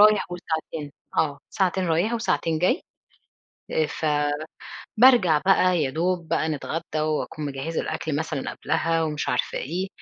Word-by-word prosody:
رايح 210 -1 +6
وساعتين 160 -4 -4 0.2
آه، 145 -3 +1
ساعتين 190 -1 +1
رايح 170 +7 +1
وساعتين 165 -8 0
جاي، 185 - +2 0.9
آآ 155 - +2
ف 155 - -4 0.9
بارجع 215 -10 +6
بقى 185 -2 +4
يا 135 - 0
دوب 170 +2 -1
بقى 160 - +1
نتغدى، 155 +2 -3 0.2
وأكون 155 0 -2
مجهّزة 140 +4 -3
الأكل 155 -3 -3
مثلًا 155 -3 -2
قبلها 165 0 0
ومش 150 -2 -2
عارفة 125 - 0
إيه، 180 +7 -3
160 Hz, 140 wpm, -25 LUFS, 155-185 Hz, 0.9 s, رايح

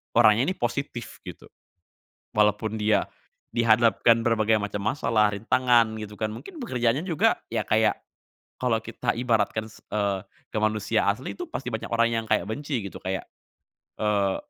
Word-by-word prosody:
orangnya 110 +5 +5
ini 185 - 0
positif 120 -2 -4
gitu. - - -10 0.9
Walaupun 105 +1 +2
dia 105 -1 +2 0.5
dihadapkan 115 0 +4
berbagai 110 -2 +2
macam 105 -1 -4
masalah, 115 -6 +2
rintangan 115 +2 +2
gitu 105 -1 -8
kan, 110 - 0
mungkin 360 - -10
pekerjaannya 130 - 0
juga 165 -5 +2
ya - - -1
kayak, - - +2 0.6
kalau 125 -3 +1
kita - - -2
ibaratkan 115 -3 +1
s - - -16
eee, 100 -2 0 0.3
ke - - -3
manusia 110 +1 +1
asli 110 +6 -1
itu 355 - -4
pasti 135 - -5
banyak 110 - -4
orang 115 0 +2
yang 115 -1 -1
kayak - - +2
benci 140 -3 -3
gitu 100 - -7
kayak, 95 +1 -3 0.7
eee, 100 -3 +1
110 Hz, 150 wpm, -26 LUFS, 105-120 Hz, 0.9 s, orangnya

